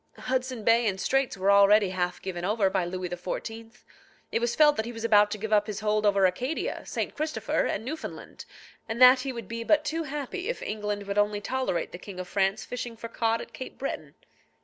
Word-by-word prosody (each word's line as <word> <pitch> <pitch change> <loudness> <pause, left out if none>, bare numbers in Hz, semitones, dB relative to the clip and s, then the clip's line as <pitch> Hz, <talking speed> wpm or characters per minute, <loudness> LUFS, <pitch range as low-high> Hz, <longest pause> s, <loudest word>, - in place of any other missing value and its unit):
Hudson 255 -2 -2
Bay 230 +2 +4
and 190 -2 -1
Straits 270 +1 0
were 195 +1 +3
already 200 0 +6
half 180 -1 -2
given 175 -2 -4
over 200 0 +1
by 180 - +1
Louis 185 +1 -4
XIV. 225 +6 -6 0.5
It - - +1
was 235 0 -1
felt 300 -1 +6
that 220 - -1
he - - -4
was 225 -1 -8
about 210 -2 +5
to 215 - -3
give 215 +1 -3
up 210 0 +4
his 210 0 -4
hold 215 0 +1
over 200 -1 +4
Acadia, 250 - -1
St. - - -3
Christopher, 300 -8 -1
and 220 - -3
Newfoundland, 310 +5 -7 0.4
and 225 +1 -3
that 255 +1 +9
he 265 +1 -3
would 235 -2 -7
be 230 0 -4
but 300 +5 +3
too 325 +2 -1
happy 295 - -4
if - - -3
England 210 -1 -3
would 200 +1 -1
only 205 0 +1
tolerate 260 -4 -2
the 175 - -8
King 185 -1 -9
of 185 - -5
France 195 +2 0
fishing 240 -2 -6
for 230 +1 -7
cod 230 0 0
at - - -11
Cape 260 - -8
Breton. 155 - -5
220 Hz, 215 wpm, -27 LUFS, 200-250 Hz, 0.5 s, that